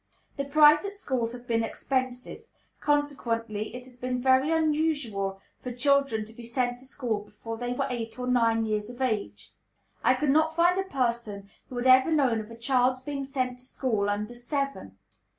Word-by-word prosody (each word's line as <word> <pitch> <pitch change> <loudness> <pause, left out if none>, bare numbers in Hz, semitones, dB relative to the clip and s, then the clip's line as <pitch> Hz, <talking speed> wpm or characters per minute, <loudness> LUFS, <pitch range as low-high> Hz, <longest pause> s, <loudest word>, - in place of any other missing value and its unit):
The 280 - -2
private 305 +7 +5
schools 255 - -1
have 245 0 -10
been 230 -1 +1
expensive, 255 - -3 0.4
consequently 230 -7 -1
it 250 - -7
has 250 -1 -15
been 250 0 -2
very 260 +3 +4
unusual 295 -12 0 0.2
for 250 - -5
children 275 -3 +2
to 220 - -10
be 235 - -11
sent 245 +1 -1
to 260 - -14
school 245 -6 -2
before 210 +2 -8
they 245 0 -2
were - - -1
eight 230 -2 -5
or 250 - -3
nine 230 -2 +2
years 210 0 -2
of 245 +1 -10
age; 115 - -2 0.5
I 255 +3 +5
could 270 +2 +1
not 315 +2 +3
find 350 +2 +4
a 385 0 -3
person 235 -6 -2 0.2
who 250 - -7
had 245 - -2
ever 260 +4 +6
known 270 -8 +2
of 215 0 -7
a 230 - -10
child's 255 +1 +2
being 280 +1 -4
sent 255 -2 -2
to - - -13
school 235 -6 -1
_under 210 +2 -2
seven! 245 - -4
250 Hz, 185 wpm, -27 LUFS, 230-275 Hz, 0.5 s, ever